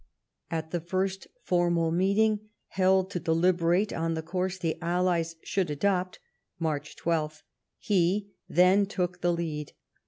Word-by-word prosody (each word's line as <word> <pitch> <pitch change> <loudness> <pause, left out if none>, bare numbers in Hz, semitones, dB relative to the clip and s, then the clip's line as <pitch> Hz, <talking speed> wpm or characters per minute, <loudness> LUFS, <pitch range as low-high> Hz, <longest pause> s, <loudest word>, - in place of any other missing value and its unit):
At 160 -1 -3
the 175 - -1
first 190 +3 -2 0.2
formal 170 -2 +2
meeting 210 +4 +2 0.2
held 190 0 +2
to 180 - -2
deliberate 175 +4 +2
on 165 0 -1
the 160 - -3
course 185 +3 -2
the 165 -3 -2
Allies 170 -1 0
should 190 -4 -1
adopt 185 +4 0 0.4
(March 150 -3 -3
12), 155 -2 -2 0.3
he, 200 +1 +1 0.2
then, 185 +3 +5
took 180 -3 -2
the 175 - +2
lead. 160 -4 -3
175 Hz, 130 wpm, -28 LUFS, 165-190 Hz, 0.4 s, then